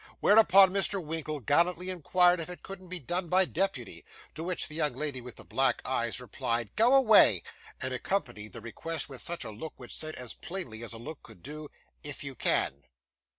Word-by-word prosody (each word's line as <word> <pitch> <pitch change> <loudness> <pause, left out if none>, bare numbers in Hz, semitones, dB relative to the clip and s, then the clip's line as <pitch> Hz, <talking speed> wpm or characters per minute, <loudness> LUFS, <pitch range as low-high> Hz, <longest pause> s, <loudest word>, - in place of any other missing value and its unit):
Whereupon 200 -3 +7
Mr. 195 0 +1
Winkle 155 -3 -4
gallantly 175 - +1
inquired 180 +1 +3
if 165 - -3
it 180 - -9
couldn't 190 -1 -9
be 185 +1 -5
done 175 +3 -3
by 185 +2 +4
deputy: 160 - -3 0.3
to 160 - -6
which 180 0 -1
the 155 - -9
young 150 -2 0
lady 145 -4 -3
with 125 0 -10
the - - -10
black 135 -3 +1
eyes 120 -2 -1
replied 115 -2 -3
'Go 240 +5 +5
away,' 230 -6 +6 0.4
and - - -2
accompanied 120 - -2
the 115 - -8
request 155 +7 -3
with 135 +1 0
a 140 -10 -3
look 135 +10 -7
which 125 - -8
said 155 0 -2
as 125 -2 -2
plainly 130 -12 -6
as 115 - -2
a - - -7
look 145 +6 -9
could 110 -6 -15
do, 150 +2 -7 0.3
'if 145 -1 -5
you 140 -1 -4
can. 70 - +1
155 Hz, 195 wpm, -29 LUFS, 125-180 Hz, 0.4 s, Whereupon